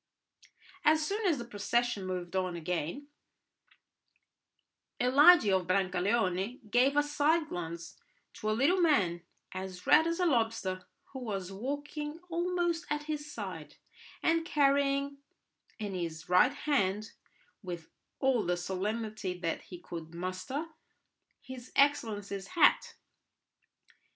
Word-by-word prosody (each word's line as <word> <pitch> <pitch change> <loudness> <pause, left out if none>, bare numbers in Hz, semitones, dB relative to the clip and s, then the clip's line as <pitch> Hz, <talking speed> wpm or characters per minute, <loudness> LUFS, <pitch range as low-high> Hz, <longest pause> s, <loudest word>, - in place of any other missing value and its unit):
As 310 0 +4
soon 405 +4 -1
as 325 -5 +2
the 240 - -6
procession 230 -1 -1
moved 180 -1 -4
on 185 -2 0
again, 170 - -3 1.9
Eligi 280 - +7
of 185 -2 +1
Brancaleone 190 +3 0
gave 265 +4 +4
a 290 - +5
side 300 +2 +1
glance 170 0 -6 0.3
to 215 - -3
a 215 - +1
little 350 +9 +3
man 195 - +3 0.3
as 185 -1 -7
red 320 - +6
as 335 +1 -1
a 360 - +2
lobster, 225 - 0 0.3
who 265 - -5
was 195 -6 -4
walking 290 +7 -4
almost 345 0 -1
at 295 0 -1
his 300 -1 -5
side, 185 - -7 0.5
and 330 0 +3
carrying 280 -2 +2 0.6
in 205 -2 -4
his 165 -3 -4
right 180 +8 +5
hand, 215 -8 0 0.5
with 175 -5 -7 0.3
all 265 -5 +2
the 180 0 0
solemnity 200 +1 -3
that 170 -2 -2
he 180 - -10
could 165 -1 -8
muster, 185 - -4 0.8
his 255 -1 -10
excellency's 205 -8 +1
hat. - - +4
225 Hz, 120 wpm, -31 LUFS, 185-290 Hz, 1.9 s, Eligi